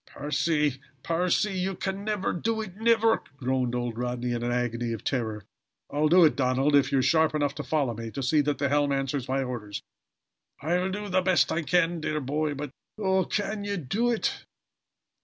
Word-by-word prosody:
"Percy! 150 -2 0 0.2
Percy! 180 +4 +1
You 190 +1 -1
can 195 +2 -3
never 210 -2 -1
do 220 +5 -1
it 205 -5 -6
never!" 225 +1 +3 0.2
groaned 130 -2 0
old 120 -2 -3
Rodney 125 0 -2
in 120 -1 -2
an 120 0 -1
agony 120 -1 -1
of 110 - -6
terror. 110 -6 -2 0.5
"I'll 150 +1 +2
do 175 +1 +7
it, 155 - +3
Donald, 135 +2 +2
if 140 - +4
you 140 - +3
are - - +4
sharp 160 +1 +3
enough 145 -2 +1
to - - -5
follow 145 -6 0
me 115 +1 -6
to 135 +4 -5
see 150 +4 +3
that 145 0 -1
the 140 - +1
helm 145 0 +2
answers 135 -1 -1
my 135 +1 +1
orders." 110 -5 -5 0.8
"I'll 175 +5 0
do 205 +2 -4
the 185 -1 +2
best 185 -1 +3
I 170 - 0
can, 165 +2 +1
dear 155 0 -1
boy. 150 +2 -1
But 145 -1 -5 0.3
Oh, 190 -3 +2
can 205 +1 -2
ye 200 0 -2
do 200 - 0
it?" 235 -2 -1
150 Hz, 195 wpm, -27 LUFS, 130-185 Hz, 0.8 s, do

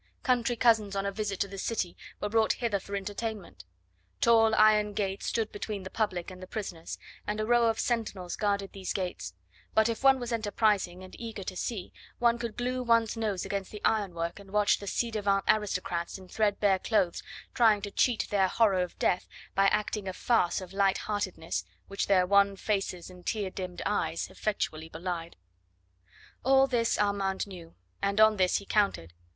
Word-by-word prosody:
Country 245 -2 +2
cousins 225 -4 +3
on 195 0 -1
a 200 - 0
visit 200 -1 -3
to 200 - +1
the 195 0 -8
city 190 -5 -2 0.2
were - - -1
brought 220 0 +3
hither 225 -5 -1
for 200 +1 -6
entertainment. 205 - -5 0.5
Tall 225 -1 +5
iron 210 -1 +5
gates 195 -1 -2
stood 225 -2 -1
between 205 -1 -5
the 190 - -8
public 185 -5 -2
and 185 0 -11
the 185 - -8
prisoners, 180 -6 -5 0.3
and 210 +1 -2
a 215 - 0
row 240 0 +4
of 225 -1 0
sentinels 210 -7 -2
guarded 200 -2 -1
these 190 -2 -4
gates; 95 - -4 0.4
but 220 0 +5
if 230 +2 -3
one 270 -1 +6
was 245 -1 -4
enterprising 205 -4 +1
and 185 - -11
eager 225 -4 -6
to 185 - -5
see, 195 -1 -4 0.2
one 235 -1 +3
could 235 -2 -5
glue 250 +1 -1
one's 230 -2 +2
nose 215 -5 -2
against 195 -2 -3
the 210 - -9
ironwork 175 -5 0
and 200 -1 -14
watch 210 +1 +3
the 200 - -8
ci 235 +4 -1
devant 200 -2 +1
aristocrats 185 -5 0
in 190 -1 -13
threadbare 205 -2 +2
clothes 185 -5 +1 0.3
trying 220 -3 +5
to 200 - -4
cheat 240 +2 +1
their 195 -2 +3
horror 195 -2 +3
of 180 - -4
death 180 - +1 0.3
by 195 0 +4
acting 210 -1 0
a 190 - -3
farce 195 -5 +1
of 185 0 -9
light 195 -1 +3
heartedness 190 - -3 0.2
which 195 - -2
their 185 -2 +4
wan 200 +1 +4
faces 195 -3 -2
and 180 -1 -14
tear 205 -4 -1
dimmed 185 -2 -5
eyes 165 -5 -1
effectually 160 -6 -3
belied. 170 0 -5 1.1
All 270 +1 +5
this 240 -3 +1
Armand 200 -2 0
knew, 175 -4 -11 0.3
and 200 +1 0
on 215 -1 +6
this 185 -1 +3
he 200 - -7
counted. 195 - 0
200 Hz, 185 wpm, -29 LUFS, 185-220 Hz, 1.1 s, one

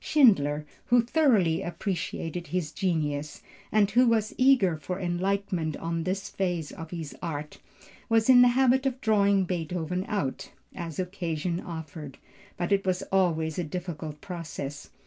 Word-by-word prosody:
Schindler, 155 - +4 0.2
who 240 -1 +5
thoroughly 230 - +3
appreciated 175 -2 -4
his 165 -1 -2
genius, 150 -5 -2 0.3
and 210 -2 +3
who 245 +4 +5
was 220 -2 +2
eager 255 -10 +4
for 180 +5 -5
enlightenment 180 -2 -1
on 165 0 -3
this 195 +2 -2
phase 175 -6 -2
of 165 -1 -8
his 165 -4 -6
art, 150 -3 -5 0.5
was 225 -1 +3
in 255 -1 +8
the 245 - +8
habit 265 +1 +4
of 260 -1 -2
drawing 200 -5 +3
Beethoven 180 +1 -2
out, 195 -11 -2 0.2
as 165 -4 -6
occasion 175 -2 -2
offered, 155 -5 -7 0.4
but 175 +2 -2
it 195 -1 +3
was 185 -1 0
always 165 -4 +1
a - - 0
difficult 160 -2 -5
process. 150 -6 -6
180 Hz, 145 wpm, -27 LUFS, 160-200 Hz, 0.5 s, in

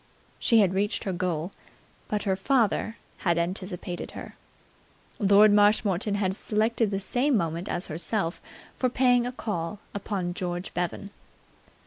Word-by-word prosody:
She 230 -2 +5
had 190 -2 +2
reached 205 +3 0
her 190 - -2
goal, 175 -1 -2 0.6
but 210 -1 -2
her 190 -2 +1
father 225 -1 +1 0.2
had 170 -3 +1
anticipated 180 0 -4
her. - - -9 0.8
Lord 205 0 +6
Marshmoreton 205 -1 +3
had 190 -2 0
selected 220 +2 +1
the 195 -1 -1
same 245 +6 +1
moment 170 0 -2
as 175 - -1
herself 170 +2 -2 0.3
for 255 - +1
paying 245 -1 +3
a - - -3
call 210 -6 -4 0.2
upon 195 -3 -3
George 175 -1 -4
Bevan. 180 +3 -3
200 Hz, 135 wpm, -27 LUFS, 180-215 Hz, 0.8 s, Lord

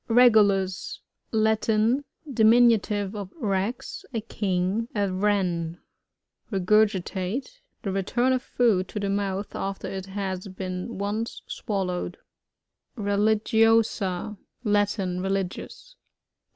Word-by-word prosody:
Rbgulus. 205 -6 +4 0.2
— - - -50
Latin. 220 +4 +2 0.2
Diminutive 220 -4 +4
of 200 -3 -6
rear, 200 0 0 0.4
a - - +1
king. 200 0 -1
A 200 -2 +1
Wren. 185 -4 0 0.7
Regurgitate. 205 - +1
— - - -47
The 195 - -2
return 240 +7 +1
of 255 - 0
food 220 -8 +2
to 210 - -5
the 200 -1 -1
mouth 200 0 -2
afler 195 0 -4
it 190 0 -5
has 190 -1 -4
been 185 -1 -5
(mce 210 +3 -3
swallowed. 185 -4 -3 0.8
Religiosa.— 215 -1 +2 0.3
Latin. 205 -4 +1
Religious. 195 - -4
205 Hz, 100 wpm, -26 LUFS, 190-220 Hz, 0.8 s, Rbgulus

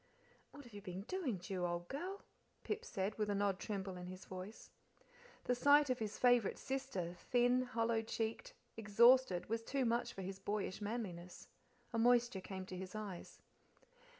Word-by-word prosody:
"What 285 - -12
have 240 -4 -15
you 205 - -8
been 190 -1 -6
doing, 290 - -2
Ju, 180 0 -4
old 175 0 -2
girl?" 365 - -5 0.4
Pip 425 +2 -2
said, 195 - -2
with 210 -1 +1
an 200 -1 +1
odd 200 -2 +1
tremble 195 -3 -4
in 180 0 -7
his 185 0 -8
voice. 185 +4 -8 0.7
The 250 - +2
sight 285 +2 +5
of 250 - 0
his 215 -1 -3
favourite 245 -4 +4
sister, 265 -11 -3
thin, 245 +1 +3
hollow 230 -2 0
checked, 225 - -3 0.2
exhausted, 225 -2 +5
was 225 +1 -1
too 265 +3 -1
much 235 +1 +1
for 195 - -6
his 190 +1 -5
boyish 200 0 -2
manliness. 195 -5 -5 0.4
A 230 - +1
moisture 240 -3 +4
came 190 0 -6
to 185 - -7
his 185 +2 -6
eyes. 205 -5 -6
215 Hz, 170 wpm, -38 LUFS, 190-245 Hz, 0.7 s, sight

